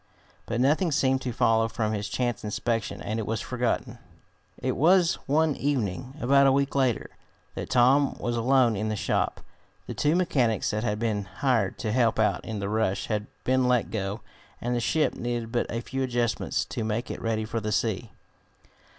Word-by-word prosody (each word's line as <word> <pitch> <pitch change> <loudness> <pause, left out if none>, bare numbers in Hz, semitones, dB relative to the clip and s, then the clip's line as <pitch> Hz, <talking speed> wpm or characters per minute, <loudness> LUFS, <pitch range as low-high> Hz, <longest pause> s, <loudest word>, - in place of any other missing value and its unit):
But 115 - -2
nothing 155 +7 +2
seemed 135 -3 +2
to 125 - -3
follow 115 0 +2
from 110 0 -2
his 105 -1 -3
chance 120 -3 -2
inspection, 110 +1 -2
and 110 +2 -2
it 110 - -4
was 115 0 -1
forgotten. 125 -2 -2 0.6
It - - -2
was 175 +3 +4
one 155 +1 +2
evening, 130 -2 -2
about 140 +1 +4
a - - +5
week 140 +1 +1
later, 130 -4 0 0.4
that - - -6
Tom 130 +3 +4
was 120 0 -2
alone 120 -1 +3
in 105 +2 -2
the 110 - -1
shop. - - -1 0.4
The - - -5
two 150 +2 +1
mechanics 130 -11 +1
that 110 +1 -2
had 105 -3 0
been 105 -3 -1
hired 110 +1 0
to 110 - -2
help 115 -1 +2
out 110 -1 +1
in 110 -2 -5
the 100 -1 -3
rush 100 -2 -1
had 105 -1 -1 0.2
been 130 0 +2
let 125 -2 +1
go, 100 0 -3 0.4
and 120 +1 -1
the - - +1
ship 155 +6 +1
needed 120 -1 -3
but 120 - 0
a 115 - -3
few 135 +2 -4
adjustments 120 -3 0
to 115 - -4
make 110 +2 -2
it - - -6
ready 110 -1 -1
for 115 +1 -3
the 105 0 -3
sea. 110 +1 -1
120 Hz, 190 wpm, -27 LUFS, 110-130 Hz, 0.6 s, a